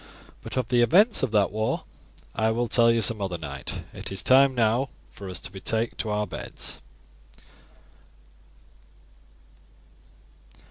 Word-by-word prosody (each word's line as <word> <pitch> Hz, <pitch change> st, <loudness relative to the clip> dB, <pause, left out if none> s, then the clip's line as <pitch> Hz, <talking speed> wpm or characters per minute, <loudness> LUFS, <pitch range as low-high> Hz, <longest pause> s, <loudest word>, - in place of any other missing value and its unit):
But -, -, -7 dB
of 125 Hz, -3 st, -1 dB
the 120 Hz, -1 st, +4 dB
events 200 Hz, -, +5 dB
of 130 Hz, -, +1 dB
that 105 Hz, -2 st, +2 dB
war 110 Hz, +1 st, -1 dB, 0.5 s
I 110 Hz, +1 st, +1 dB
will 120 Hz, +2 st, 0 dB
tell 115 Hz, 0 st, +4 dB
you 115 Hz, -1 st, +3 dB
some 110 Hz, -1 st, 0 dB
other 95 Hz, -3 st, -2 dB
night. 70 Hz, -4 st, -6 dB
It -, -, -7 dB
is 95 Hz, -2 st, -5 dB
time 135 Hz, +1 st, +5 dB
now 120 Hz, +3 st, +2 dB, 0.2 s
for 100 Hz, -2 st, -9 dB
us 90 Hz, -, -5 dB
to 100 Hz, -, -6 dB
betake 110 Hz, +4 st, -2 dB
us -, -, -25 dB
to 110 Hz, -, -2 dB
our 105 Hz, 0 st, 0 dB
beds." -, -, -6 dB
110 Hz, 145 wpm, -26 LUFS, 100-120 Hz, 0.5 s, events